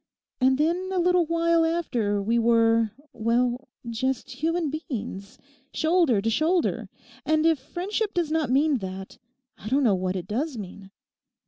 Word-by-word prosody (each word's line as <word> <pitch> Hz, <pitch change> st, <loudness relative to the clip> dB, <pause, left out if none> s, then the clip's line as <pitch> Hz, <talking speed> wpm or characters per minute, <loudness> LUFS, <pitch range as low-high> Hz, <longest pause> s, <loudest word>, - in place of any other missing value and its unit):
And 260 Hz, 0 st, +3 dB
then 345 Hz, +5 st, 0 dB
a 380 Hz, -, -1 dB
little 360 Hz, -1 st, +3 dB
while 335 Hz, 0 st, +2 dB
after 240 Hz, -12 st, 0 dB
we 230 Hz, +3 st, +1 dB
were, 230 Hz, -1 st, +3 dB, 0.2 s
well, 240 Hz, +3 st, 0 dB, 0.2 s
just 260 Hz, +3 st, -2 dB
human 320 Hz, +3 st, -1 dB
beings, 230 Hz, -, -6 dB, 0.4 s
shoulder 315 Hz, -, +2 dB
to 225 Hz, -, +1 dB
shoulder, 325 Hz, +8 st, 0 dB, 0.3 s
and 315 Hz, 0 st, +1 dB
if 325 Hz, -3 st, +3 dB
friendship 400 Hz, -, -3 dB
does 340 Hz, -3 st, 0 dB
not 315 Hz, -4 st, 0 dB
mean 280 Hz, +1 st, +2 dB
that, 190 Hz, 0 st, -7 dB, 0.4 s
I 215 Hz, -, -7 dB
don't 275 Hz, +3 st, +2 dB
know 225 Hz, -5 st, +4 dB
what 185 Hz, 0 st, -1 dB
it 180 Hz, -2 st, -4 dB
does 255 Hz, +6 st, -2 dB
mean. 195 Hz, -1 st, -9 dB
265 Hz, 150 wpm, -25 LUFS, 225-330 Hz, 0.4 s, know